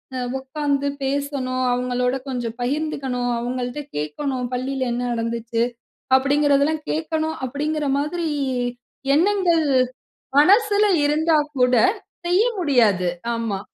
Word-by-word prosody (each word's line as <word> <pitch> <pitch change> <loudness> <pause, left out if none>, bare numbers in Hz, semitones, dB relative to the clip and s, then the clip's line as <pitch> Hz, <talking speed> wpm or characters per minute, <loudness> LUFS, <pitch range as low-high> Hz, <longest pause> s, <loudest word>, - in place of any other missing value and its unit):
அ - - -2 0.2
உட்கார்ந்து 280 +1 -1
பேசணும், 270 -2 -1
அவங்களோட 250 +1 0
கொஞ்சம் 240 -2 -4
பகிர்ந்துகணும். 260 -3 -1
அவங்கள்ட 245 +3 -3 0.2
கேட்கணும், 250 - -2
"பள்ளியில 260 0 -2
என்ன 240 +1 -2
நடந்துச்சு." 230 0 -1 0.5
அப்டிங்கிறதெல்லாம், 285 +2 +2
கேட்கணும் 315 0 -2
அப்டிங்கிற 295 +3 -2
மாதிரி 325 +3 -2 0.9
எண்ணங்கள் 350 -2 +3 0.7
மனசுல 415 +5 +5 0.2
இருந்தா 310 +2 +3 0.2
கூட 250 0 +4 0.5
செய்ய 365 +5 +4 0.2
முடியாது. 220 - +3 0.3
ஆமா. 225 -4 -2
275 Hz, 95 wpm, -22 LUFS, 245-310 Hz, 0.9 s, மனசுல